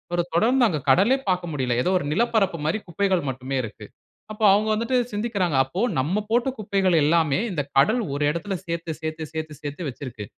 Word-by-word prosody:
1 175 - +1
தொடர்ந்து 240 +6 +4
அங்க 155 -7 -1
கடலே 205 - +5
பார்க்க 180 -2 0
முடியல. 130 -4 -1
ஏதோ - - +1
1 - - -5
நிலப்பரப்பு 215 -3 +1
மாரி 190 +8 0
குப்பைகள் 185 +1 +1
மட்டுமே 130 +1 -4
இருக்கு. 110 -1 -8 0.5
அப்ப 215 - -13
அவுங்க 215 +2 +2
வந்துட்டு 230 +4 0
சிந்திக்கிறாங்க. 205 - -1
அப்ப 185 - -1
நம்ம 185 +10 0
போட்ட 240 +3 +2
குப்பைகள் 195 -3 +1
எல்லாமே 160 0 +2
இந்த 150 -5 -1
கடல் 220 - +4
1 145 - -1
இடத்தில 185 +4 -3
சேர்த்து, 170 -1 -4
சேர்த்து, 155 0 -4
சேர்த்து, 155 -1 -5
சேர்த்து 145 +2 -5
வச்சுருக்கு. 125 -4 -7
175 Hz, 180 wpm, -24 LUFS, 150-210 Hz, 0.5 s, கடலே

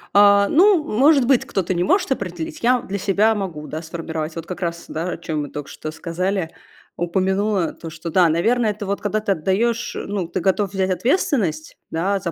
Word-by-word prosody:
А, 200 0 +6
ну, 360 -1 +5
может 275 +1 +4
быть, 260 -1 +3
кто-то 185 -1 -1
не 175 0 0
может 370 - +2
определить. 175 -9 -4
Я 245 0 +3
для 200 +1 -5
себя 205 +4 +3
могу, 175 -8 -5
да, 155 +1 -5
сформировать. 160 -1 -5
Вот 165 -1 -6
как 180 0 -7
раз, 170 -1 -3
да, 165 +3 -3
о - - -5
чем 155 -2 -3
мы 145 - -5
только 145 -1 -7
что 155 - -7
сказали, 180 +2 -2 0.4
упомянула, 190 +2 0
то, 165 - -9
что, 165 +1 -7
да, 175 -2 +5
наверное, 220 +8 +2
это 205 0 -6
вот 200 +1 -2
когда 210 +1 0
ты 205 - -1
отдаешь, 230 +8 0
э, - - -4
ну, 195 -3 -3
ты 170 - -3
готов 195 0 +1
взять 190 -1 0
ответственность, 195 - 0
да, 195 +5 0
за 170 -2 -3
190 Hz, 205 wpm, -21 LUFS, 165-215 Hz, 0.4 s, А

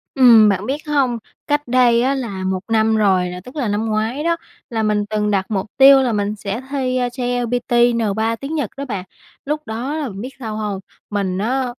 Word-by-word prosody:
Ừm, 230 -5 +7
bạn 195 0 -1
biết 285 +5 -4
hông, 270 -5 +1 0.3
cách 290 -1 0
đây 240 -1 +4
á 265 +3 +2
là 215 -8 -4
1 185 0 -1
năm 220 0 +3
rồi 190 -4 +2
nè, 180 0 -6
tức 250 - -12
là 275 -7 -1
năm 210 +2 -1
ngoái 220 +6 -1
đó, 335 +1 +2 0.3
là 225 -2 -1
mình 210 -1 +1
từng 210 -1 0
đặt 195 -2 +1
mục 195 -2 -1
tiêu 270 0 +8
là 250 -3 0
mình 205 0 -1
sẽ 200 +2 -4
thi 255 -2 0
JLPT, 245 0 -2 0.2
N3 225 0 0
tiếng 285 +3 -4
Nhật 285 -9 -1
đó 280 - -4
bạn. 195 -7 -5 0.4
Lúc 300 +2 -2
đó 255 +7 -3
bạn 205 -9 -5
biết 250 - -5
sao 220 -4 -5
hông, 210 -3 -3 0.3
mình 195 -3 -1
á, 255 +6 0
230 Hz, 210 wpm, -19 LUFS, 210-260 Hz, 0.4 s, tiêu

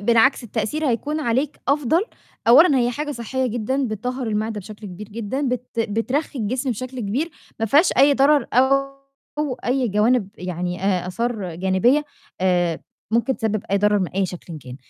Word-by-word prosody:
بالعكس 235 +4 +3
التأثير 235 +7 -2
هيكون 295 +6 -1
عليك 265 +3 -1
أفضل. 295 +3 +3 0.5
أولًا، 280 +2 +7
هي 240 0 +2
حاجة 295 +4 -4
صحّية 255 +2 -2
جدًا 245 +3 -1
بتطهّر 250 +4 -3
المِعدة 215 0 -2
بشكل 210 +2 -10
كبير 195 +2 -9
جدًا، 230 +5 -4
بت 250 0 -2
بترخّي 230 +7 -1
الجسم 250 +4 -1
بشكل 255 +3 -5
كبير، 245 +11 -1 0.3
ما 225 - +1
فيهاش 295 - +4
أي 280 +2 +6
ضرر 280 +2 +4
أو 275 +1 0
أي 250 0 +1
جوانب 210 +1 +2
يعني 180 0 -4
آآ، 185 -3 +1
آثار 205 -3 -3
جانبية 190 - +2 0.4
آآ 175 -3 +1 0.3
ممكن 235 +4 +1
تسبب 215 -2 -1
أي 200 - +3
ضرر 210 0 +3
من 185 - -1
أي 190 0 0
شكلٍ 170 -2 -8
كان. 125 -2 -10
235 Hz, 160 wpm, -22 LUFS, 205-270 Hz, 0.5 s, أولًا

